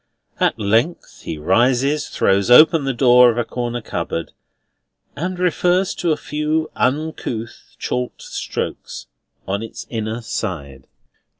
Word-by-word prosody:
At - - +2
length 115 +10 0
he 80 - -4
rises, 125 - +2
throws 100 +1 +1
open 155 +3 +7
the 135 - +1
door 125 0 +6
of 120 - -1
a 120 - +1
corner 120 0 -3
cupboard, 85 - -4 0.8
and 180 +5 -3
refers 180 +1 +1
to 170 - -1
a 155 - +1
few 155 +1 -2
uncouth 130 -5 -3
chalked 125 0 -3
strokes - - -5 0.4
on 100 +2 -1
its 115 - -8
inner 110 0 -3
side. 70 - -5
125 Hz, 125 wpm, -20 LUFS, 110-150 Hz, 0.8 s, open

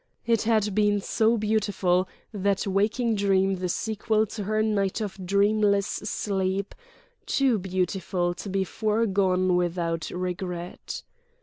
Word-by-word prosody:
It 230 -2 +2
had 215 -3 +2
been 205 0 +3
so 225 +3 +2
beautiful, 205 -4 +1 0.2
that 200 -1 0
waking 210 +4 +1
dream 195 -2 +2
the 180 0 -2
sequel 220 +2 0
to 210 -1 -6
her 215 +1 +1
night 200 -2 0
of 200 -3 -5
dreamless 200 +1 +3
sleep, 195 -1 -2 0.5
too 260 -6 +2
beautiful 185 -1 -1
to 195 - -7
be 195 0 +1
foregone 190 -4 +1
without 170 -2 -1
regret. 180 -1 -5
200 Hz, 120 wpm, -26 LUFS, 185-215 Hz, 0.5 s, been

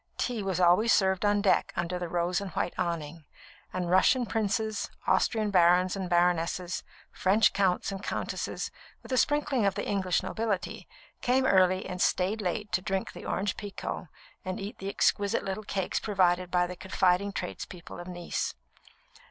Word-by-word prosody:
tea 240 -4 -1
was 190 -2 -1
always 180 +6 +5
served 190 -2 +3
on 205 0 +3
deck 195 - +3
under 175 +1 -2
the 175 -1 -4
rose 175 +2 0
and 200 - -5
white 175 - -1
awning; 165 -2 -3 0.5
and 180 -1 -2
Russian 240 +7 +4
princes, 215 0 -1 0.2
Austrian 215 -3 +2
barons 180 0 +4
and 190 -2 -4
baronesses, 175 +1 +1 0.3
French 205 +4 +3
counts 190 -1 +1
and 195 -1 -5
countesses, - - -3 0.3
with - - -11
a 255 - +1
sprinkling 290 -4 +2
of 200 -1 +2
the 205 - -3
English 190 -3 +1
nobility, 220 -4 -3 0.3
came 260 +2 +2
early 185 -4 +4
and 180 0 -5
stayed 195 +4 +1
late 205 +3 -2
to 180 0 +1
drink 190 0 -2
the - - -10
Orange 195 0 -1
Pekoe 200 -3 -5 0.4
and 185 0 -4
eat 200 +2 -6
the 195 - -4
exquisite 200 0 +1
little 195 +2 -3
cakes 195 -2 -2
provided 185 -3 +1
by 180 0 +2
the 180 +1 -6
confiding 190 +1 +1
tradespeople 180 -3 -7
of 175 - -8
Nice. 175 -1 -3
190 Hz, 165 wpm, -29 LUFS, 180-205 Hz, 0.5 s, always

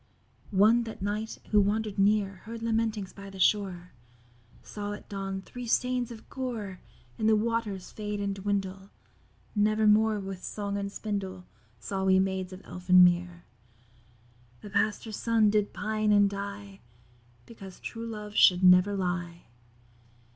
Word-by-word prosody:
One 225 +5 +5
that 220 -3 -7
night 210 +2 -3
who 210 -1 +6
wander'd 210 0 -1
near 200 -1 +2
Heard 230 0 -7
lamentings 220 -3 -1
by 200 0 -10
the 195 - -11
shore, 185 -2 +1 0.7
Saw 205 0 -5
at 205 - -10
dawn 195 -1 -4
three 245 +3 -8
stains 250 +1 +1
of 230 -2 -11
gore 225 -8 -5 0.4
In 215 - +1
the 220 - +5
waters 215 -4 -2
fade 210 -1 -4
and 200 -1 -1
dwindle. 195 -1 -3 0.7
Never 215 +1 +2
more 215 0 +4
with 195 -2 -7
song 200 -1 -4
and 200 0 -3
spindle 195 -4 -4 0.3
Saw 190 - -4
we 190 0 +5
Maids 190 -1 0
of 185 +1 -11
Elfin 180 0 +5
Mere, 175 0 +2 1.2
The 205 - -10
Pastor's 215 +1 -1
Son 225 -2 +3
did 210 -1 +1
pine 215 0 -1
and 205 -1 +5
die; 200 0 -6 0.7
Because 195 -5 -12
true 230 0 -6
love 210 -2 -7
should 180 -3 +5
never 180 +2 +6
lie. 175 -2 -3
205 Hz, 145 wpm, -28 LUFS, 190-215 Hz, 1.2 s, who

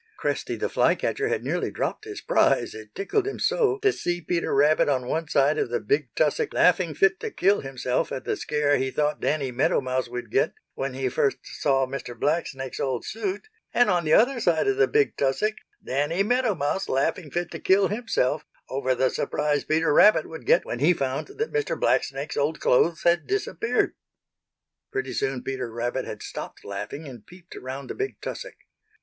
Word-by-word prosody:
Cresty - - -2
the - - -2
Fly - - +3
catcher 425 0 -1
had - - -1
nearly - - -1
dropped 430 - -3
his 420 -1 -7
prize, - - +2
it 110 -1 -11
tickled 385 - 0
him 410 - -3
so 440 -5 +2
to 410 - +4
see 175 0 -2
Peter 170 +1 -1
Rabbit 145 +2 +4
on 130 -3 0
one 160 +5 -2
side 145 +1 +2
of - - 0
the 120 0 0
big 135 +6 0
tussock 150 -2 +1
laughing 175 -3 +3
fit 195 +3 +3
to - - -4
kill 195 +2 +2
himself 130 -2 -2
at 130 - -4
the - - 0
scare 150 -1 +1
he 130 - -1
thought 150 +2 -1
Danny 140 -4 0
Meadow 125 +3 +2
Mouse 130 -1 -2
would 120 -2 -6
get 135 - +2 0.2
when 135 -1 -4
he 135 0 -1
first 135 +2 +1
saw 135 -2 0
Mr. 130 -3 -7
Blacksnake's 140 -4 -1
old 130 -3 -2
suit, 205 - -4 0.3
and 245 -4 +5
on 175 -1 +2
the 155 0 +2
other 245 +3 +4
side 175 - +2
of 405 0 +2
the 415 0 +4
big 430 -1 +2
tussock 175 +11 0 0.3
Danny 145 +8 0
Meadow 245 -1 +1
Mouse 155 +6 -1
laughing 145 +4 0
fit 175 +3 -3
to - - -6
kill 195 0 +3
himself 210 - 0 0.3
over 130 -1 0
the 130 +1 +2
surprise 150 -1 0
Peter 155 0 +1
Rabbit 210 -1 +6
would 160 - -10
get - - +4
when 120 - -4
he 155 +6 +5
found 135 -2 -2
that 440 +4 -4
Mr. 440 -1 -1
Blacksnake's 140 +3 0
old 145 +2 0
clothes 160 +6 +2
had 170 0 +3
disappeared. 410 +2 0 1.0
Pretty 415 +1 -3
soon 135 -2 -2
Peter 130 -3 -4
Rabbit 120 +1 -2
had - - -7
stopped - - -8
laughing 105 +10 -6
and 125 -3 -10
peeped 180 0 -14
around 130 +2 -6
the - - -4
big 405 0 -4
tussock. - - -6
150 Hz, 195 wpm, -25 LUFS, 135-195 Hz, 1.0 s, Rabbit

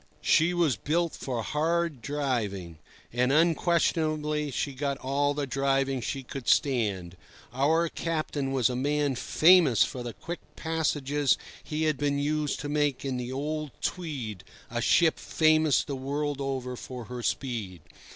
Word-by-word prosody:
She 165 +3 +4
was 170 - +2
built 165 +8 0
for 120 -4 -4
hard 160 -1 0
driving, 110 - -2 0.3
and 125 +2 +2
unquestionably 155 -2 +2
she 140 +1 -2
got 140 +1 -2
all 140 +2 0
the 145 -1 -1
driving 135 0 0
she 135 +4 -3
could 130 0 -8
stand. 100 -10 +1 0.4
Our 160 +6 +2
captain 155 -4 -2
was 130 -4 +3
a 125 - -2
man 145 +2 +1
famous 155 - +5
for 125 - -4
the 120 -1 -5
quick 175 +1 -6 0.2
passages 145 -3 0 0.3
he 155 +1 -2
had 155 -3 +1
been 145 -1 +1
used 150 0 -1
to 145 - -4
make 145 -2 0
in 130 -2 -1
the 125 0 -4
old 150 +3 -3
Tweed, 135 - -4 0.3
a - - -1
ship 165 -2 +4
famous 155 -2 +3
the 140 - -4
world 140 +2 -2
over 130 -2 -3
for 125 0 -7
her 125 +1 -6
speed. 110 - -3
140 Hz, 150 wpm, -28 LUFS, 130-155 Hz, 0.4 s, famous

